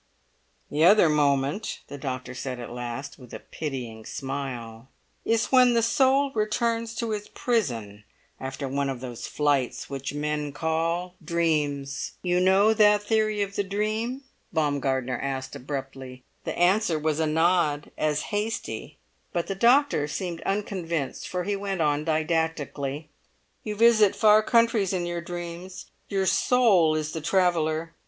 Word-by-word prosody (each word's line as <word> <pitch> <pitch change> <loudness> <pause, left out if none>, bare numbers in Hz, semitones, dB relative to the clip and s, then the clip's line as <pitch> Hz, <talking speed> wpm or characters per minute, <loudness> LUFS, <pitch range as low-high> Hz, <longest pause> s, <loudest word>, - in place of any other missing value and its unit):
"The 150 +2 +1
other 185 -1 +7
moment," 145 +5 +1
the 145 - -8
doctor 130 -2 -4
said 125 0 -5
at 120 - -7
last, 125 +4 -6
with 125 -2 -11
a - - -6
pitying 125 -7 -6
smile, 130 -3 -6 0.3
"is 230 0 +1
when 250 -2 +6
the 230 - +3
soul 270 +4 +3
returns 230 +1 -1
to 230 -1 -2
its 210 -1 -4
prison 115 - -2 0.4
after 135 +1 -5
one 140 +1 -1
of 130 -2 -4
those 125 -2 -6
flights 145 -3 0
which 135 -1 -4
men 150 0 -2
call 165 +3 -1
dreams. 150 -4 -1
You 180 0 +2
know 190 +4 +5
that 210 -1 +4
theory 215 -1 +1
of 200 0 -6
the 205 - +1
dream?" 215 +6 -2 0.3
Baumgartner 135 -5 0
asked 135 0 -4
abruptly. 135 -2 -7 0.2
The - - -3
answer 180 -1 +3
was 155 0 -1
a 160 - +1
nod 155 -2 +1
as 150 -1 0
hasty, 210 +2 -3 0.3
but 170 -2 -1
the 195 - -3
doctor 235 - +3
seemed 170 +2 -4
unconvinced, 175 -7 -2
for 180 -1 -2
he 200 +2 -1
went 195 -2 -3
on 150 -1 +1
didactically: 155 -2 -1 0.5
"You 210 -1 -4
visit 220 -2 +5
far 215 -1 +6
countries 230 -4 +2
in 180 -2 -1
your 175 0 -3
dreams; 175 +1 -7 0.2
your 195 -1 0
soul 190 -9 +4
is 155 0 -2
the 160 - -5
traveller. 165 -2 +1
165 Hz, 145 wpm, -26 LUFS, 140-205 Hz, 0.5 s, other